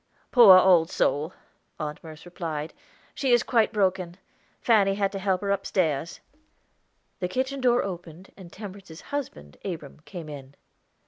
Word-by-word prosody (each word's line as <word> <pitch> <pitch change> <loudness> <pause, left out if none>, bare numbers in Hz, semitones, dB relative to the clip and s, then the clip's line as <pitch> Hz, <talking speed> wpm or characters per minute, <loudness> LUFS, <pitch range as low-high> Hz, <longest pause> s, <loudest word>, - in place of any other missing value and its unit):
"Poor 220 -7 +9
old 180 -3 +5
soul," 150 +4 0 0.5
Aunt 150 -1 -5
Merce 160 0 -11
replied, 165 -3 -5 0.4
"she 265 -3 +1
is 240 - +4
quite 230 -3 +2
broken. 185 -4 0 0.4
Fanny 200 -4 +3
had 200 -1 0
to 195 - -5
help 190 -1 0
her 200 -1 -1
upstairs." 170 -6 -1 1.0
The 180 - -1
kitchen 260 +7 -2
door 245 -1 +3
opened, 175 -1 -8
and 180 -3 -13
Temperance's 195 -5 -10
husband, 75 - -5
Abram, 160 -8 -7
came 175 -3 -9
in. 140 -2 -10
185 Hz, 140 wpm, -26 LUFS, 160-200 Hz, 1.0 s, Poor